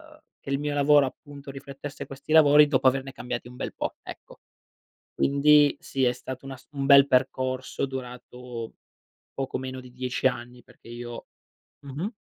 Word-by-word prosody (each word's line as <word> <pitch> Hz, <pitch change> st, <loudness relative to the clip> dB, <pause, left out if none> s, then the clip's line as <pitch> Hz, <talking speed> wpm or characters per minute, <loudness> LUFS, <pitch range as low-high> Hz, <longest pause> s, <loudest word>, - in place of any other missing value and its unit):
uhm, -, -, -22 dB, 0.2 s
che 135 Hz, -, -7 dB
il 140 Hz, -, 0 dB
mio 145 Hz, 0 st, -2 dB
lavoro 145 Hz, -1 st, +5 dB
appunto 140 Hz, +1 st, -11 dB
riflettesse 135 Hz, +1 st, -8 dB
questi 135 Hz, +2 st, -10 dB
lavori 150 Hz, -1 st, +7 dB
dopo 135 Hz, -2 st, 0 dB
averne 135 Hz, +1 st, +1 dB
cambiati 125 Hz, -2 st, -5 dB
un 125 Hz, -, -12 dB
bel -, -, -5 dB
po', -, -, -4 dB
ecco. -, -, -12 dB, 0.7 s
Quindi 145 Hz, +1 st, +4 dB
sì, 135 Hz, -1 st, -1 dB
è 125 Hz, -, +3 dB
stato 130 Hz, +1 st, -8 dB
un 135 Hz, -, -7 dB
ass 130 Hz, -, -12 dB
un 140 Hz, -1 st, -3 dB
bel 140 Hz, 0 st, +8 dB
percorso 130 Hz, 0 st, 0 dB
durato 125 Hz, -2 st, -8 dB, 0.6 s
poco 135 Hz, -1 st, -3 dB
meno 130 Hz, 0 st, -6 dB
di 125 Hz, 0 st, -13 dB
10 125 Hz, +1 st, -2 dB
anni. 125 Hz, 0 st, -2 dB
Perché -, -, -19 dB
io 120 Hz, 0 st, -8 dB, 0.5 s
mh-mh. 145 Hz, -, -5 dB
135 Hz, 165 wpm, -26 LUFS, 125-140 Hz, 0.7 s, bel